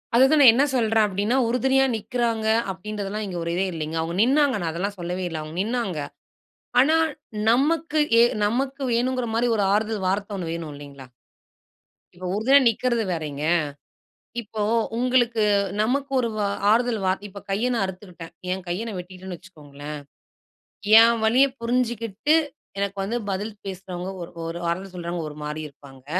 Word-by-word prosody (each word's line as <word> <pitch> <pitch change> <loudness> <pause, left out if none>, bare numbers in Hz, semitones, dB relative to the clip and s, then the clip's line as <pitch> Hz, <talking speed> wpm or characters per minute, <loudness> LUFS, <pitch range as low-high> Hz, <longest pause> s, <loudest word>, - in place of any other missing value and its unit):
அதுதான் 265 +5 +5
நான் 255 -5 +10
என்னா 270 +5 +3
சொல்றேன் 225 -3 +3
அப்படீன்னா, 205 +5 0
"உறுதுணையா 265 +2 +3
நிக்கிறாங்க" 225 0 -1 0.2
அப்படீன்றதெல்லாம் 210 +2 -5
இங்க 185 -3 -5
ஒரு 170 - -3
இதே 190 - +1
இல்லைங்க. 160 0 -4
அவுங்க 165 +1 -3
நின்னாங்க. 275 +2 +3
நான் 165 -1 -1
அதெல்லாம் 195 +4 -3
சொல்லவே 180 +2 -3
இல்லை. 165 -2 -4
அவுங்க 155 +3 -8
நின்னாங்க. 220 -7 -2 0.8
ஆனா 305 +5 +5 0.5
நமக்கு, 305 +5 +2 0.2
எ - - +8 0.2
நமக்கு 265 +5 -1
வேணும்ங்கிற 250 +1 0
மாரி 240 +1 +2
ஒரு 205 - +2
ஆறுதல் 210 -2 0
வார்த்த 200 +2 -1
ஒண்ணு 170 -3 -4
வேணும், 165 -3 -6
இல்லைங்களா? 140 -2 -11 1.1
இப்போ 180 +1 -6
உறுதுணையா 265 +7 +5
நிக்கிறது 235 0 0
வேறயிங்க. 150 -3 -4 1.0
இப்போ 215 -1 -5 0.3
உங்களுக்கு 240 -3 +2 0.4
நமக்கு 270 +5 0
ஒரு 235 - +1
வ - - -2 0.3
ஆறுதல் 235 -1 +2
வார்த் 190 +2 0
இப்ப 200 +1 -10
கைய 220 +6 0
நான் 200 - +1
அறுத்துக்கிட்டேன். 180 -3 -8 0.2
என் 185 0 -4
கைய 185 +6 -2
நா 220 - -5
வெட்டிக்ட்டேன்னு 185 0 -8
வச்சுக்கோங்களேன். 150 -4 -10 1.0
என் 230 0 +4
வலியப் 260 +4 +4
புரிஞ்சுகிட்டு, 235 +2 0 0.4
எனக்கு 200 0 -2
வந்து 230 +5 -2
பதில் 205 +3 -3
பேசுறவங்க, 185 -1 -6
ஒரு 170 - -7 0.2
ஒரு 170 +1 -5
வார்த்த 185 +3 -2
சொல்றவங்க, 170 -1 -4
ஒரு 150 - -11
மாரி 150 +1 -4
இருப்பாங்க. 135 -2 -17
205 Hz, 150 wpm, -24 LUFS, 175-240 Hz, 1.1 s, நான்